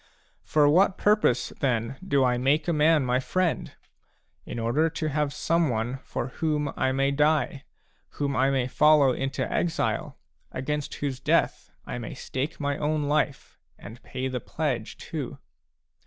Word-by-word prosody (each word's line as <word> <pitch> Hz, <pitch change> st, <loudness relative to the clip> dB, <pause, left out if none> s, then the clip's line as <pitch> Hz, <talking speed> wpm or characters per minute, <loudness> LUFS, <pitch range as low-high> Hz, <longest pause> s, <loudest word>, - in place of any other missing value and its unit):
For 150 Hz, -1 st, +3 dB
what 185 Hz, +5 st, +4 dB
purpose, 210 Hz, -, +2 dB
then, 125 Hz, -1 st, 0 dB
do 140 Hz, -7 st, +2 dB
I 125 Hz, -1 st, +3 dB
make 145 Hz, +4 st, +2 dB
a 170 Hz, -, +2 dB
man 155 Hz, -2 st, +4 dB
my 125 Hz, +1 st, +2 dB
friend? 180 Hz, +5 st, -1 dB, 0.8 s
In -, -, -5 dB
order 120 Hz, +8 st, +1 dB
to 155 Hz, -1 st, -3 dB
have 150 Hz, 0 st, 0 dB
someone 135 Hz, -6 st, 0 dB
for 125 Hz, -, -4 dB
whom 150 Hz, 0 st, -1 dB
I 130 Hz, -, +1 dB
may 135 Hz, +1 st, +1 dB
die, 150 Hz, -1 st, +1 dB, 0.5 s
whom 140 Hz, -1 st, -2 dB
I 130 Hz, +2 st, +3 dB
may 135 Hz, -2 st, +1 dB
follow 150 Hz, 0 st, +5 dB
into 135 Hz, +2 st, -2 dB
exile, 170 Hz, -2 st, -1 dB, 0.3 s
against 150 Hz, +2 st, -3 dB
whose 135 Hz, -3 st, -3 dB
death -, -, +1 dB, 0.2 s
I -, -, -5 dB
may 115 Hz, -, -6 dB
stake 140 Hz, +6 st, -4 dB
my 145 Hz, 0 st, -1 dB
own 150 Hz, 0 st, 0 dB
life, 145 Hz, -1 st, -1 dB, 0.2 s
and 110 Hz, +5 st, -11 dB
pay 130 Hz, 0 st, -4 dB
the 130 Hz, -1 st, -3 dB
pledge, -, -, -3 dB
too. -, -, -6 dB
140 Hz, 155 wpm, -26 LUFS, 130-155 Hz, 0.8 s, follow